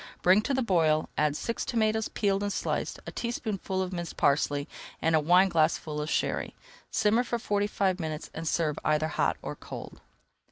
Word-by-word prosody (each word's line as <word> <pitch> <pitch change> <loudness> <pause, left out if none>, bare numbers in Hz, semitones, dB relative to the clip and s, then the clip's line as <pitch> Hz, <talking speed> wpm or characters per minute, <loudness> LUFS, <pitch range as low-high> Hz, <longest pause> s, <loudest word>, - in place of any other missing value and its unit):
Bring 185 +4 +6
to 275 - -1
the 260 - +1
boil, 160 -7 +2
add 150 -1 +1
six 230 +8 -2
tomatoes 220 -2 +1
peeled 200 -2 0
and 205 0 -1
sliced, - - -2
a - - -6
teaspoonful 205 -5 -2
of 185 0 -5
minced 175 -2 -5
parsley, 145 0 +2 0.3
and 165 0 +2
a - - +5
wineglassful 160 -2 +3
of 150 - -3
Sherry. - - -1 0.3
Simmer 220 +3 +2
for 235 -1 -2
forty 205 -3 0
five 195 -2 0
minutes 155 -2 -4
and 160 0 -5
serve 155 -2 0
either 155 +1 +1
hot - - 0
or - - -4
cold. - - -9
185 Hz, 175 wpm, -28 LUFS, 155-210 Hz, 0.3 s, Bring